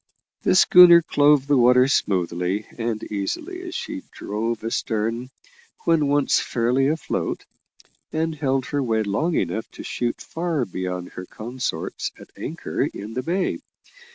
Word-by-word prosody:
The - - +2
schooner 175 -1 +8
clove 145 -2 +4
the 140 -2 +3
water 125 +1 +5
smoothly 90 -4 0
and 115 -2 -3
easily 105 - -3
as 350 - -6
she 300 -3 -4
drove 110 +2 -3
astern 115 +2 -2 0.6
when 165 -3 +3
once 145 0 +3
fairly 125 +3 +1
afloat, 155 +1 -2 0.7
and 160 +1 -1
held 135 -4 -1
her 145 - 0
way 110 -4 +1
long 150 - 0
enough 100 +5 -2
to - - -9
shoot 120 -1 -2
far 165 -6 -2
beyond 90 -2 -4
her 90 0 -9
consorts 115 -7 -4
at - - -14
anchor - - -4
in 105 +3 -3
the 130 - -2
bay. 180 +7 -1
125 Hz, 140 wpm, -23 LUFS, 105-150 Hz, 0.7 s, schooner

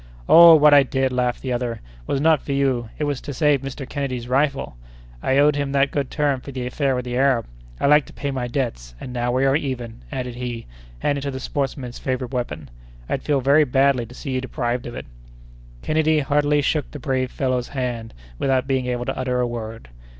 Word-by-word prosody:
"Oh! 170 0 +9
what 150 -1 +6
I 145 - +8
did," 135 -1 0
laughed 125 -1 -1
the 130 -2 -1
other, 120 -1 -2 0.3
"was 140 - 0
not 155 0 +3
for 140 - -4
you; 130 -4 0
it 150 - -2
was 145 -3 -2
to 145 -3 -7
save 145 -1 +3
Mr. 135 0 -6
Kennedy's 130 -4 -4
rifle. 135 - 0 0.5
I 135 - +1
owed 145 +1 +5
him 140 -1 -2
that 140 0 +2
good 140 -2 -2
turn 145 -3 0
for 140 - -9
the 130 -2 -4
affair 135 +1 0
with 125 0 -3
the 125 0 -4
Arab! 130 -2 +2 0.3
I - - 0
like 150 0 +5
to - - -14
pay 140 - -3
my 130 -2 -3
debts, 115 - -3
and 125 - -7
now 120 0 -1
we 130 +2 +1
are 135 0 +3
even," 125 -6 -4
added 125 -2 -4
he, 120 -1 -5 0.3
handing 140 - -1
to 140 - -3
the 130 -1 -5
sportsman 135 0 -3
his 120 - -10
favorite 130 0 -3
weapon. 80 - -4 0.4
"I'd - - -2
feel 145 -2 0
very 140 +4 +5
badly 135 -2 +2
to 125 - -13
see 135 - -6
you 130 0 -1
deprived 125 -1 -3
of 120 - -7
it." - - -6 0.8
Kennedy 155 0 +2
heartily 145 +1 +2
shook 150 +1 0
the - - -8
brave 130 -1 -1
fellow's 130 -2 -1
hand, 120 - -4 0.2
without 130 -1 +1
being 130 -2 -1
able 125 -1 -2
to - - -2
utter 125 -1 -1
a 125 - +2
word. 115 - -6
130 Hz, 220 wpm, -22 LUFS, 125-140 Hz, 0.8 s, Oh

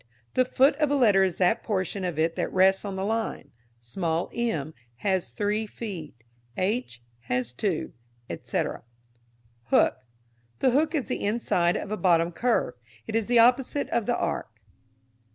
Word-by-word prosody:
_ - - -30 0.3
The 255 - +3
foot 270 +3 +4
of 300 -2 +2
a 285 - +2
letter 210 -8 +5
is 185 -3 0
that 185 +4 +2
portion 195 -2 -2
of 175 -4 -2
it 165 +1 +1
that - - -2
rests 190 +1 +4
on 200 -2 -4
the 190 0 -2
line. 225 +1 -2 0.3
Small 160 +8 -2
m 160 -11 -2 0.3
has 190 - +1
three 210 - -1
feet, 165 - -8 0.3
h 185 - -2 0.2
has 125 0 -1
two, 175 - -2 0.3
etc. 85 - -3 0.8
Hook. - - +3 0.6
The 255 - +3
hook 305 +5 +2
is 285 - 0
the - - -3
inside 190 -5 +1
of 200 - -6
a 215 - -1
bottom 170 -3 +3
curve. 230 - 0 0.3
It - - -6
is 225 -2 +1
the 240 0 +3
opposite 250 +4 +3
of 235 -3 0
the - - +1
arc. - - -2
195 Hz, 165 wpm, -26 LUFS, 165-235 Hz, 0.8 s, letter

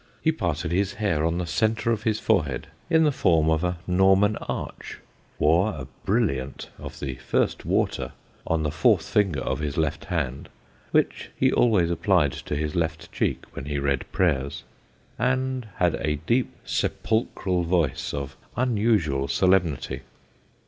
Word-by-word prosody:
He 160 - +2
parted 85 - -2
his 100 +2 +1
hair 100 -8 0
on 85 +1 +1
the 90 - -1
centre 110 +6 +1
of 110 -2 0
his 110 -1 0
forehead 80 - +1 0.2
in 160 -1 +5
the 150 - +4
form 80 - +3
of 80 +1 +1
a 90 0 0
Norman 95 +3 +4
arch, - - -6 0.4
wore 85 +7 +4
a 65 - -6 0.2
brilliant 70 - -1
of - - -8
the 65 -2 -4
first 65 - 0
water - - 0 0.4
on 80 -1 +1
the 75 - 0
fourth - - +3
finger 95 -10 +1
of - - -2
his 75 -2 -3
left 75 -1 -1
hand 70 -7 -3 0.4
(which - - +1
he - - +3
always 95 -8 +3
applied 85 - +3
to - - -5
his 75 0 -2
left 80 -1 -2
cheek - - -1
when - - -6
he 75 0 -2
read 70 -1 -1
prayers), 70 -7 0 0.6
and 130 0 0
had 90 -2 +2
a 75 -1 -1
deep 120 +7 +2
sepulchral 95 -5 0
voice 85 -5 0
of 70 -1 -5 0.2
unusual 105 - +2
solemnity. 90 -7 +1
85 Hz, 155 wpm, -25 LUFS, 75-105 Hz, 0.6 s, in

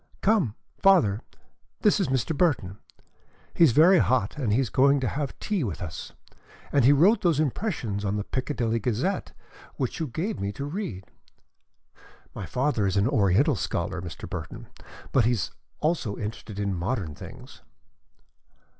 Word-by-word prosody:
"Come. 195 - +2 0.3
Father, 120 - +4 0.6
this 210 0 +4
is 190 - +1
Mr. 130 +4 0
Burton. 125 - 0 0.7
He - - +4
is 145 - +4
very 170 +8 +6
hot 120 -5 +1
and 125 -8 -1
he 110 - +3
is 130 -6 -1
going 140 +2 +4
to 130 - 0
have 140 0 -3
tea 205 -7 -1
with 100 -9 -3
us, 85 -3 -7 0.6
and 140 - +3
he 130 - +7
wrote 190 +10 +5
those 170 -6 +2
impressions 135 - -2
in 100 0 -1
the 105 - -2
Piccadilly 115 -1 -1
Gazette 125 - -1 0.4
which - - -3
you 160 - -1
gave 165 - -3
me 100 +1 -2
to 140 +8 -5
read. 145 - -5 1.3
My - - -6
father 125 -6 0
is 95 +1 0
an 100 +3 +3
Oriental 120 - +3
scholar, 90 0 -2
Mr. 85 -2 -7
Burton, - - -7 0.4
but 125 -4 +3
he 120 - +3
is 100 -10 -2 0.3
also 150 -10 0
interested 105 -1 -6
in 100 -1 -1
modern 90 -2 -2
things." - - -12
125 Hz, 160 wpm, -26 LUFS, 100-155 Hz, 1.3 s, he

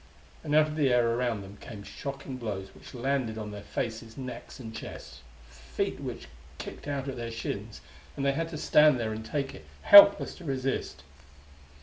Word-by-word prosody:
And 150 -1 0
out 155 0 +7
of 155 0 -6
the 145 -3 +3
air 120 -1 +3
around 120 -3 -1
them 100 +1 -11
came 105 -3 -9
shocking 135 +2 -6
blows 100 -5 -5
which - - -13
landed 125 -3 -1
on 105 -1 -5
their 105 0 -7
faces, 115 +2 -5
necks 130 0 -8
and 110 -3 -8
chests; - - -9 0.3
feet 65 0 -4
which - - -6 0.3
kicked - - -8
out 140 -2 -3
at 135 - -4
their 115 -1 -4
shins; 110 -2 -5 0.4
and 140 - -1
they 140 - +4
had 165 +3 -2
to 160 - -6
stand 150 -3 +5
there 110 -2 -2
and 110 +1 -6
take 140 +3 -3
it, 75 - -13 0.2
helpless 200 - +9
to 185 - -12
resist. 135 -3 -3
125 Hz, 190 wpm, -29 LUFS, 110-140 Hz, 0.4 s, helpless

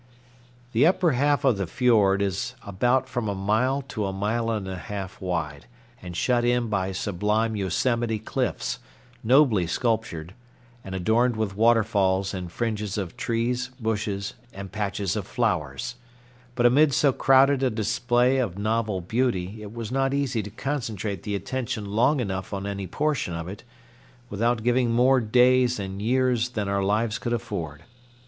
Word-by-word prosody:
The 125 +7 +4
upper 180 -2 +3
half 145 +2 +2
of 125 -6 +4
the 95 -2 -2
fiord 100 -2 +3
is 100 +6 -2
about 125 +7 +1
from 120 -5 -2
a 100 - -2
mile 110 +8 +1
to 105 -3 -2
a - - -2
mile 110 +4 -1
and 105 -4 -2
a 95 - -4
half 95 +1 -7
wide, 75 -8 -3 0.3
and 90 -1 -7
shut 120 +2 +2
in 120 -1 +1
by 95 -2 -1
sublime 105 +4 0
Yosemite 110 +4 0
cliffs, 110 - -2 0.4
nobly 120 - +4
sculptured, 90 -5 -2 0.5
and 95 -1 -6
adorned 115 +6 +2
with 110 -3 -2
waterfalls 105 -4 +2
and 90 -3 -5
fringes 105 -2 -2
of 95 -5 -4
trees, 120 +2 -1
bushes, 105 -3 -2 0.2
and 95 0 -8
patches 100 -3 -2
of - - -4
flowers; 125 0 -2 0.6
but 120 - +1
amid 140 +3 +5
so 140 -3 +3
crowded 135 +1 +4
a 130 - +3
display 120 +4 +1
of 100 -8 -2
novel 110 -2 -1
beauty 110 -1 -1
it 105 -1 -8
was 115 -1 -6
not 135 +1 +1
easy 130 -5 0
to 105 - -7
concentrate 110 - -3
the 105 - -3
attention 120 +1 -3
long 120 +8 +2
enough 95 -3 -3
on 100 0 -4
any 100 -1 -4
portion 145 - -1
of 85 0 -5
it 100 +3 -8 0.7
without 115 +2 0
giving 120 0 +2
more 125 +2 +4
days 125 +2 +3
and 95 0 -5
years 125 +1 +1
than 105 -5 -3
our 100 0 0
lives 110 +3 0
could 120 - -2
afford. 85 -10 -4
110 Hz, 160 wpm, -25 LUFS, 100-125 Hz, 0.7 s, amid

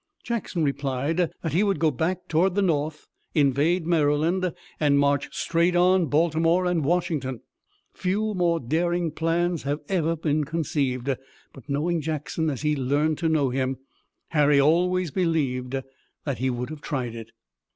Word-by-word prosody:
Jackson 220 -8 -2
replied 140 +2 -1 0.3
that 160 - -2
he 175 - +3
would 200 -2 +2
go 160 -2 +2
back 175 +7 -2
toward 175 +3 +2
the 200 - +2
north, 155 -3 -1 0.3
invade 150 +4 +2
Maryland 165 +3 +2 0.3
and 145 -2 +3
march 140 0 +2
straight 170 +1 +1
on 180 0 +4
Baltimore 165 +3 +2
and 175 -3 +1
Washington. 145 -6 -1 0.5
Few 210 +4 -1
more 175 -3 +1
daring 170 +5 0
plans 165 +1 0
have 145 +2 -2
ever 165 -3 +1
been 155 -1 0
conceived, 140 -5 -1 0.5
but, 135 - -15
knowing 160 +4 0
Jackson 155 +1 -2
as 140 -1 -4
he 150 0 +2
learned 145 +3 0
to 165 -1 +1
know 145 -5 +2
him, 130 0 -1 0.5
Harry 150 -2 +4
always 175 +3 +2
believed 135 -7 0 0.5
that 140 -6 -2
he 130 +1 +1
would 125 +2 -3
have 155 -2 -8
tried 130 -7 -3
it. 115 -1 -8
155 Hz, 150 wpm, -25 LUFS, 140-175 Hz, 0.5 s, on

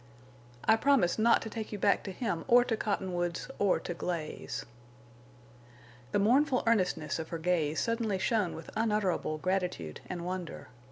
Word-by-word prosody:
"I 220 - +5
promise 245 -9 +3
not 230 +2 +4
to 225 - -5
take 220 -2 -5
you 210 - -3
back 200 0 +3
to 195 - -4
him 185 -4 -2
or 245 +1 +7
to 240 -2 -1
Cottonwoods 180 -3 -2
or 200 -2 +3
to 175 - -4
Glaze." 170 -2 -4 1.5
The - - +2
mournful 255 +6 +3
earnestness 185 -9 +1
of 160 - -5
her 165 - -3
gaze 160 -2 0
suddenly 230 -3 0
shone 195 -1 0
with 160 - -9
unutterable 210 -8 0
gratitude 180 - -2
and 175 -1 -4
wonder. 180 -2 -5
190 Hz, 155 wpm, -31 LUFS, 175-225 Hz, 1.5 s, or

